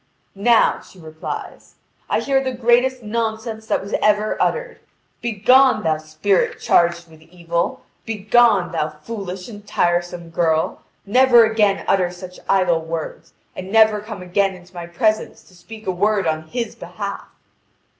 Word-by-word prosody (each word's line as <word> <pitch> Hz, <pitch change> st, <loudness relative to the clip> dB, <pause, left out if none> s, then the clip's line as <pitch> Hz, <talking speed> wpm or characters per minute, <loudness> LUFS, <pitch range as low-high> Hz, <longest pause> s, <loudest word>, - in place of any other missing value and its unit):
"Now," 220 Hz, +3 st, +3 dB
she -, -, -18 dB
replies, 160 Hz, -1 st, -8 dB, 0.3 s
"I -, -, +1 dB
hear 270 Hz, -1 st, +1 dB
the 260 Hz, -1 st, -2 dB
greatest 245 Hz, +1 st, +2 dB
nonsense 220 Hz, 0 st, -3 dB
that -, -, 0 dB
was 200 Hz, -, -8 dB
ever 210 Hz, 0 st, +2 dB
uttered. 485 Hz, 0 st, -1 dB, 0.4 s
Begone, 250 Hz, +4 st, +4 dB
thou 155 Hz, -1 st, 0 dB
spirit 155 Hz, +5 st, 0 dB
charged 170 Hz, 0 st, +2 dB
with 160 Hz, -1 st, -18 dB
evil! 170 Hz, 0 st, -3 dB, 0.2 s
Begone, 210 Hz, -3 st, +3 dB
thou 155 Hz, -3 st, -1 dB
foolish 185 Hz, +3 st, -7 dB
and 210 Hz, -3 st, -10 dB
tiresome 175 Hz, -1 st, -1 dB
girl! 160 Hz, -1 st, 0 dB, 0.2 s
Never 245 Hz, +2 st, +6 dB
again 215 Hz, -3 st, +1 dB
utter 185 Hz, -2 st, +2 dB
such 180 Hz, 0 st, -11 dB
idle 180 Hz, -4 st, +2 dB
words, 160 Hz, -1 st, -6 dB, 0.2 s
and 185 Hz, +1 st, -7 dB
never 220 Hz, -1 st, +5 dB
come 210 Hz, -3 st, -8 dB
again 190 Hz, +1 st, 0 dB
into 180 Hz, 0 st, -17 dB
my 175 Hz, -1 st, -7 dB
presence 215 Hz, +5 st, -1 dB
to -, -, -22 dB
speak 215 Hz, +5 st, -12 dB
a 190 Hz, -, 0 dB
word 200 Hz, +1 st, +1 dB
on 160 Hz, 0 st, -2 dB
his 235 Hz, +2 st, -4 dB
behalf!" -, -, -7 dB
195 Hz, 145 wpm, -20 LUFS, 175-225 Hz, 0.4 s, Never